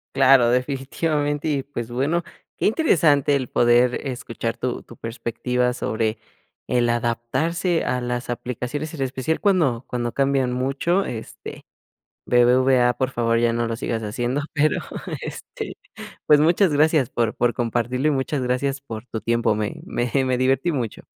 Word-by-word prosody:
Claro, 130 -3 +6
definitivamente, 145 +4 -1
y 140 -2 0
pues, 120 -5 -6
bueno, 145 +8 0 0.3
qué - - +1
interesante 155 - +3
el 130 -3 -2
poder 120 +1 +4
escuchar 115 -2 -4
tu 125 -1 -3
tu 120 - -14
perspectiva 125 +2 -2
sobre 110 -2 -1 0.5
el 120 -1 +2
adaptarse 130 +9 0
a 125 - 0
las 120 0 -3
aplicaciones, 125 +5 -4
en 150 - -6
especial 135 +4 -1
cuando 160 - +2
cuando 120 -1 -2
cambian 135 -2 +1
mucho, 140 +9 0
este, 115 -9 -8 0.6
BBVA 125 0 +4
por 130 +1 -1
favor 115 -1 +1
ya 120 0 +2
no 115 0 -1
lo 115 - -2
sigas 115 -1 -3
haciendo 120 +5 -2
pero, 150 0 +2 0.4
este, - - -7 0.5
pues 150 -1 +6
muchas 170 +3 +4
gracias 150 -3 +3
por 115 -2 -1
por 120 0 +1
compartirlo, 120 +3 -1
y 155 - +3
muchas 135 +1 -1
gracias 130 +2 -1
por 115 -4 -8
tu 110 - -4
tiempo, 115 -1 +1
me 105 -1 -2
me 120 0 -2
me 130 -1 0
divertí 135 +6 +2
mucho. 120 -7 -3
125 Hz, 150 wpm, -22 LUFS, 120-145 Hz, 0.6 s, Claro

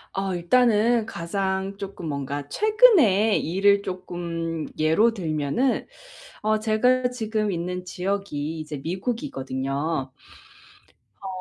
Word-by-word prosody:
어 195 -1 -1
일단은 225 +4 +3
가장 190 +2 -2
쪼끔 195 -4 -6
뭔가 140 0 -4
최근에 330 - +4
일을 200 +4 +3
쪼끔 170 -3 -4
예로 185 +10 +3
들면은 160 - -1 0.6
어 215 0 +2
제가 250 +4 +2
지금 215 -4 -2
있는 180 +1 -3
지역이 180 -5 -3
이제 150 -2 -6
미국이거든요. 140 - -3 1.1
어 195 - -7
190 Hz, 215 characters per minute, -24 LUFS, 160-220 Hz, 1.1 s, 최근에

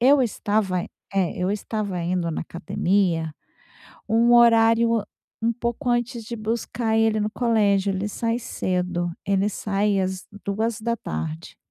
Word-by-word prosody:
Eu 270 +3 +6
estava, 205 -5 0
eh - - -8 0.5
eu 180 +1 0
estava 205 -2 -3
indo 175 0 -1
na 155 - -3
academia 170 -2 0 0.7
um 230 +2 +4
horário 230 -1 +5
an 220 - 0 0.4
um 230 +1 +1
pouco 240 +3 -3
antes 240 -1 0
de 235 - -5
buscar 225 0 -1
ele 225 -1 +3
no 210 0 0
colégio. 205 -4 +2
Ele 190 +2 -2
sai 230 +2 -1
cedo, 180 -5 -2 0.2
ele 195 0 +2
sai 205 0 0
às 190 0 -3 0.2
14h. 200 - -3
215 Hz, 135 wpm, -24 LUFS, 185-230 Hz, 0.7 s, Eu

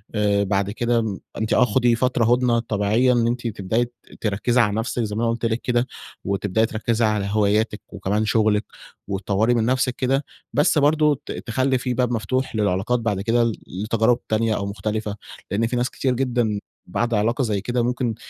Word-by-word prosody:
آآ 100 -1 +2
بعد 100 0 0
كده 120 +2 +1
م 105 -4 -3 0.2
أنتِ 110 - -1
آه 125 - +5
خُدي 120 +1 +2
فترة 125 -1 +1
هدنة 125 -1 +2
طبيعية، 115 +3 +2
إن 120 -1 +2
أنتِ 120 0 -1
تبدأي 110 +2 -1
ت 120 - -16 0.3
تركّزي 115 +4 +1
على 105 -3 +1
نفسِك 115 +2 -1
زي 105 -1 -3
ما 115 - -1
أنا 115 - +2
قلت 115 0 -3
لِك 115 +1 0
كده، 120 0 0 0.4
وتبدأي 100 +2 +1
تركّزي 115 +1 0
على 105 -2 0
هواياتِك 105 +1 +1
وكمان 100 +2 -1
شغلِك 110 -1 +2 0.4
وتطوري 100 +4 +1
من 115 -2 +1
نفسِك 130 0 +1
كده، 135 +2 0 0.3
بس 145 +4 +3
برضه 150 -1 +3
ت - - -6
تخلّي 130 +3 0
في 125 0 -2
باب 125 0 0
مفتوح 130 +2 -1
للعلاقات 105 +3 +1
بعد 110 -4 -1
كده 115 +3 +2
ل 115 -1 +1
لتجارب 110 +5 +1
تانية 110 0 +1
أو 100 - -2
مختلفة، 105 +1 -3 0.4
لإن 115 +3 +1
في 120 - -3
ناس 125 +1 0
كتير 130 -2 -1
جدًا 120 -5 0 0.3
بعد 120 0 -1
علاقة 115 +5 +1
زي 105 -4 -1
كده 120 +3 -1
ممكن 120 -1 -1
115 Hz, 190 wpm, -22 LUFS, 105-125 Hz, 0.4 s, آه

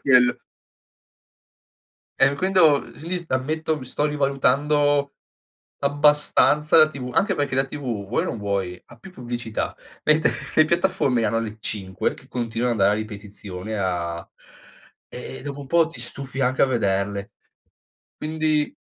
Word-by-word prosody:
quello. 125 -2 +5 1.8
Eh, 135 +1 +5
quindi, 170 -3 +4
quindi 175 +3 -5
ammetto 155 +5 -1
mi 130 - -8
sto 145 +3 -1
rivalutando 145 0 +2 0.6
abbastanza 150 +2 +3
la 155 -1 +8
TV, 130 -4 -6
anche 195 - +2
perché 145 -4 -1
la 135 - +3
TV 145 +2 -8 0.3
vuoi 115 - 0
o - - -3
non 115 - -3
vuoi, 100 -3 -2
ha 120 - -15
più 185 - -13
pubblicità. 120 -6 -4 0.3
Mentre 155 +1 +4 0.2
le 155 - +6
piattaforme 155 -8 +1
hanno 115 +2 +1
le 110 -1 -5
5 95 -4 -2
che - - -17
continuano 120 0 -1
ad 105 - -4
andare 105 +2 +4
a - - -1
ripetizione 105 -1 -7
a 85 -3 -2 0.8
eh, - - -7
e - - -10
dopo 145 0 -6
un 140 - -8
po' 170 +2 +4
ti 165 - -10
stufi 135 -1 -6
anche 130 0 +2
a - - +6
vederle. 100 -3 -1 0.9
Quindi 155 - 0
135 Hz, 145 wpm, -23 LUFS, 110-150 Hz, 1.8 s, la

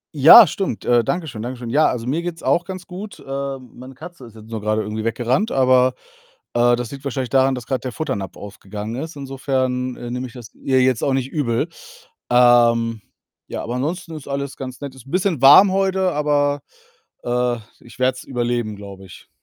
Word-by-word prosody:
Ja, 160 - +10
stimmt. 180 - -3
Äh, 120 -2 +3
danke 175 -2 -2
schön. 110 -6 -7
Danke 125 +2 -5
schön. 120 -1 -7
Ja, 150 +6 +4
also, 120 -2 -2
mir 150 +7 -1
geht's 175 -1 -6
auch 170 0 +2
ganz 185 -2 -7
gut. 200 +3 -9
Äh, 135 0 -4
meine 130 +1 -13
Katze 160 0 -11
ist 115 -2 -15
jetzt 110 0 -14
nur 115 -1 -4
gerade 110 +1 0
irgendwie 110 +1 -4
weggerannt, 125 - 0
aber, 130 -1 +4 0.6
äh, 120 0 +4
das 120 0 -5
liegt 140 -1 -9
wahrscheinlich 130 -2 -3
daran, 135 0 +3
dass 125 -2 -7
grad 130 -2 -2
der 125 - -4
Futternapf 105 - -4
aufgegangen 105 +2 -7
ist. 160 +1 -7
Insofern, 130 -2 -2
äh, 120 0 -7
nehme 125 +1 -4
ich 120 - -15
das 120 -2 -11
ihr 130 -1 +1
jetzt 125 -2 +2
auch 140 - +1
nicht 130 0 -1
übel. 140 0 -1 0.6
Ähm, 120 -2 +4 0.5
ja, - - -5
aber 120 - -4
ansonsten 165 +6 -3
ist 150 -3 -10
alles 140 0 -4
ganz 130 -2 -7
nett. 140 -2 -7
Ist 130 0 -15
'n - - -12
bisschen 180 -6 0
warm 165 +9 +8
heute, 190 -1 +1
aber, 145 -1 +1 0.6
äh, 120 0 0 0.2
ich 120 - -15
werde 130 0 +2
es - - -9
überleben, 120 -4 -2
glaube 100 -1 -11
ich. 90 - -15
130 Hz, 205 wpm, -20 LUFS, 120-145 Hz, 0.6 s, Ja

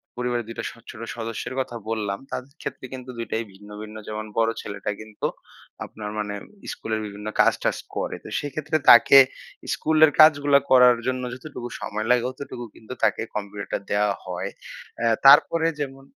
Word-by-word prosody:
পরিবারের 120 -1 -2
২ 115 - -8
টা - - -2
স - - -10 0.2
ছোট 110 - -11 0.2
সদস্যের 115 +2 -5
কথা 130 -2 -3
বললাম। 105 -3 -2
তাদের 130 +2 -6
ক্ষেত্রে - - -6
কিন্তু 130 0 -8
২ 115 - -3
টাই 110 +1 0
ভিন্ন, 105 +2 -15
ভিন্ন। 110 0 -9
যেমন 110 0 -4
বড় 115 0 +3
ছেলেটা 100 +1 -4
কিন্তু 110 -1 -4 0.6
আপনার 105 -1 -8
মানে 105 -1 -3 0.4
স্কুলের 110 -1 -3
বিভিন্ন 105 +1 -8
কাজ-টাজ - - +3 0.2
করে। - - -2
তো - - -10
সেইক্ষেত্রে 150 +2 -2
তাকে 120 +3 +9 0.6
স্কুলের 155 -1 +4
কাজগুলা 145 -2 +7
করার 125 -2 +7
জন্য 130 0 -1
যতটুকু 125 -2 -8
সময় 110 +1 -3
লাগে 125 -1 +4
অতটুকু 130 -2 -8
কিন্তু 115 +3 -9
তাকে 110 -1 +2
কম্পিউটারটা 100 -1 -4
দেয়া 105 0 +2
হয়। 90 +1 -4 0.5
অ্যা 115 - +2 0.2
তারপরে 160 +4 +7
যেমন 135 -1 -5
120 Hz, 165 wpm, -24 LUFS, 105-135 Hz, 0.6 s, তাকে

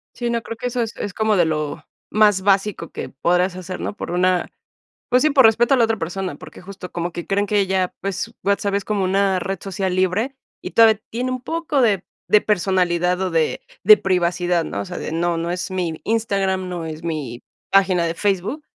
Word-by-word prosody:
Sí, 240 -1 -2
no, 235 0 0
creo 230 - -7
que 250 - -3
eso 245 0 -1
es 225 0 -3
es 205 - -4
como 220 -1 +1
de 175 - +4
lo 150 -2 -3 0.2
más 210 -2 +4
básico 195 -3 +1
que - - -5
podrás 180 +6 +1
hacer, 185 0 -6
¿no? - - -4
Por - - -6
una, 180 0 +1 0.6
pues 250 0 +3
sí, 310 - +4
por 275 -3 +5
respeto 235 +4 +5
a - - +4
la 240 - +4
otra 225 0 0
persona, 180 -1 -4
porque - - -12
justo 190 -1 -9
como 175 0 -3
que 175 0 -7
creen 200 +1 +1
que 205 -1 +2
ya, 185 -1 0
pues, 195 +3 -3
WhatsApp 200 0 +1
es 200 -1 0
como 205 -1 -1
una 190 0 +2
red 195 +1 -3
social 190 -1 -2
libre, 195 +9 0 0.2
y - - -6
todavía 220 -2 +5
tiene 250 +3 -2
un 255 - -3
poco 325 0 -1
de 205 -7 +2 0.2
de 210 - +6
personalidad 180 -3 +1
o 190 -1 -1
de 165 -2 0 0.2
de 215 +2 +9
privacidad, 180 -2 0
¿no? 100 - -4
O - - -6
sea, - - -7
de - - -5
no 170 +1 0
no 170 +1 -2
es 180 +2 -3
mi 175 -4 -2
Instagram, 195 -4 0
no 175 -2 -4
es 160 0 -7
mi 150 -8 -4 0.3
página 190 -3 +3
de 165 - -2
Facebook, 205 - -1
190 Hz, 215 wpm, -21 LUFS, 175-215 Hz, 0.6 s, de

